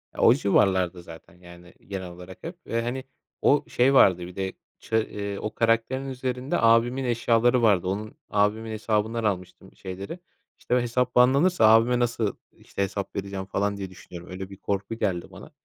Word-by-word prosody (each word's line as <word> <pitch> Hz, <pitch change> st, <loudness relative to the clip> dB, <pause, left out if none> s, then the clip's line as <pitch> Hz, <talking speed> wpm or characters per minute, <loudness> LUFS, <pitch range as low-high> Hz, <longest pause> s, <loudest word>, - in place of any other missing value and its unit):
E, -, -, -14 dB
o 115 Hz, -, +7 dB
civarlarda 95 Hz, -6 st, +2 dB
zaten. 85 Hz, +1 st, -14 dB
Yani, 90 Hz, 0 st, -15 dB
genel 95 Hz, -2 st, -5 dB
olarak 90 Hz, +1 st, -12 dB
hep. 170 Hz, +1 st, -7 dB
Eee, 115 Hz, 0 st, -1 dB
hani, 125 Hz, +3 st, -3 dB, 0.4 s
o 145 Hz, +1 st, +4 dB
şey 130 Hz, +3 st, +3 dB
vardı 95 Hz, -9 st, +6 dB
bir 90 Hz, -, -12 dB
de 95 Hz, -1 st, -3 dB, 0.3 s
ça 110 Hz, -, -1 dB
eee, 100 Hz, -2 st, -3 dB
o 110 Hz, -, -4 dB
karakterin 115 Hz, +4 st, +1 dB
üzerinde 130 Hz, +1 st, -2 dB
abimin 115 Hz, +3 st, +3 dB
eşyaları 120 Hz, 0 st, +2 dB
vardı. 100 Hz, -5 st, +3 dB
Onun 105 Hz, +3 st, -4 dB
abimin 105 Hz, +2 st, +1 dB
hesabından 110 Hz, +1 st, -1 dB
almıştım 95 Hz, -2 st, -4 dB
şeyleri. 95 Hz, -, -7 dB, 0.4 s
İşte, 125 Hz, -, -1 dB
o -, -, +4 dB
hesap 125 Hz, +1 st, -1 dB
banlanırsa 135 Hz, +5 st, +4 dB
abime 115 Hz, +2 st, +5 dB
nasıl, 115 Hz, -3 st, 0 dB, 0.2 s
işte, -, -, -7 dB
hesap 100 Hz, 0 st, -4 dB
vereceğim 100 Hz, -1 st, -4 dB
falan 100 Hz, +1 st, -1 dB
diye 95 Hz, -1 st, -5 dB
düşünüyorum. 90 Hz, -1 st, -12 dB
Öyle 95 Hz, +1 st, -6 dB
bir 100 Hz, -, -11 dB
korku 100 Hz, +2 st, -3 dB
geldi 90 Hz, -6 st, -2 dB
bana. -, -, -12 dB
110 Hz, 175 wpm, -25 LUFS, 95-120 Hz, 0.4 s, o